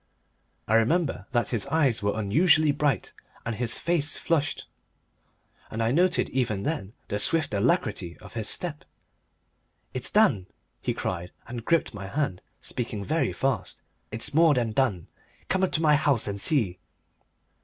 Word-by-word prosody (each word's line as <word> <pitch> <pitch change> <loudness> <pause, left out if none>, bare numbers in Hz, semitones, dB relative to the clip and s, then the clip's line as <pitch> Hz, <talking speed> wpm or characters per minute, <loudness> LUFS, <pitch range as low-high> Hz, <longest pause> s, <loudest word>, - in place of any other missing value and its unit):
I 110 - 0
remember 135 +9 +2
that 120 -3 +1
his 115 -2 0
eyes 140 -5 +2
were 100 +2 -1
unusually 155 - +4
bright 145 -6 -1 0.3
and 115 - -2
his 120 +1 +1
face 165 -3 0
flushed, 155 -4 -1 1.0
and 115 +1 -2
I 115 - +1
noted 175 +5 +2
even 115 -6 -1
then 110 -10 -3 0.2
the 105 - -1
swift 155 +2 +3
alacrity 100 - 0
of - - -14
his 110 -3 -2
step. 160 -4 -2 1.1
"It's 130 -1 -3
done," 140 - +3 0.3
he - - -2
cried, 90 -1 -4 0.2
and 120 0 -6
gripped 165 +1 +1
my 100 -2 -7
hand, 135 -5 -2 0.2
speaking 110 -4 -4
very 160 +2 0
fast; 130 -9 -2 0.3
"it's 110 +4 -2
more 160 -1 +5
than 120 -3 0
done. 110 -8 0 0.4
Come 190 0 +1
up 190 - +2
to 160 - 0
my 150 -1 +5
house 145 -7 +2
and 100 -1 -3
see." 105 - +2
125 Hz, 155 wpm, -26 LUFS, 105-155 Hz, 1.1 s, more